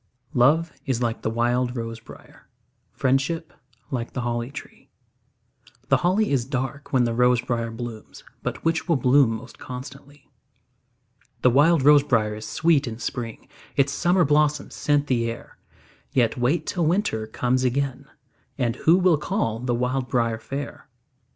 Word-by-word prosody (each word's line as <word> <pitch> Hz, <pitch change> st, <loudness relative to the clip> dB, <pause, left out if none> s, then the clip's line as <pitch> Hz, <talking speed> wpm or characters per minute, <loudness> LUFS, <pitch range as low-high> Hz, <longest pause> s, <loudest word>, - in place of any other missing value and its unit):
Love 155 Hz, +7 st, +3 dB
is 130 Hz, -3 st, 0 dB
like 115 Hz, -1 st, -2 dB
the -, -, -1 dB
wild 120 Hz, +2 st, 0 dB
rose 115 Hz, -1 st, -5 dB
briar; 115 Hz, -, -16 dB, 0.4 s
Friendship 135 Hz, +5 st, 0 dB, 0.4 s
like 120 Hz, -3 st, -3 dB
the 125 Hz, -, -3 dB
holly 120 Hz, 0 st, -2 dB
tree. 140 Hz, -, -11 dB, 1.0 s
The -, -, +5 dB
holly 185 Hz, +3 st, +1 dB
is 135 Hz, -4 st, +2 dB
dark 135 Hz, +2 st, -4 dB
when 130 Hz, -2 st, +3 dB
the 120 Hz, -1 st, 0 dB
rose 125 Hz, +1 st, +3 dB
briar 120 Hz, -1 st, -2 dB
blooms, 115 Hz, -1 st, -8 dB, 0.2 s
But -, -, -5 dB
which 165 Hz, +2 st, 0 dB
will 165 Hz, -, +4 dB
bloom 130 Hz, 0 st, +4 dB
most 125 Hz, +3 st, -11 dB
constantly? 135 Hz, +2 st, -10 dB, 1.2 s
The 125 Hz, -, +6 dB
wild 150 Hz, +3 st, +4 dB
rose 145 Hz, 0 st, +7 dB
briar 115 Hz, -6 st, +1 dB
is 110 Hz, +1 st, -7 dB
sweet 155 Hz, -4 st, +2 dB
in 110 Hz, -1 st, -5 dB
spring, 115 Hz, -1 st, -5 dB, 0.3 s
Its 140 Hz, +1 st, +2 dB
summer 175 Hz, +1 st, +3 dB
blossoms 150 Hz, 0 st, +1 dB
scent 145 Hz, -1 st, +1 dB
the 120 Hz, -4 st, 0 dB
air; 115 Hz, -, -9 dB, 0.5 s
Yet 120 Hz, -4 st, +2 dB
wait 125 Hz, +8 st, 0 dB
till 170 Hz, -4 st, 0 dB
winter 160 Hz, -, 0 dB
comes 125 Hz, +3 st, 0 dB
again, 135 Hz, +1 st, -1 dB, 0.5 s
And 125 Hz, -3 st, -1 dB
who 165 Hz, +3 st, +4 dB
will 180 Hz, -4 st, +4 dB
call 130 Hz, -, -1 dB
the 125 Hz, 0 st, -1 dB
wild 125 Hz, +1 st, -1 dB
briar 115 Hz, -2 st, 0 dB
fair? 140 Hz, +4 st, -7 dB
130 Hz, 155 wpm, -24 LUFS, 120-145 Hz, 1.2 s, rose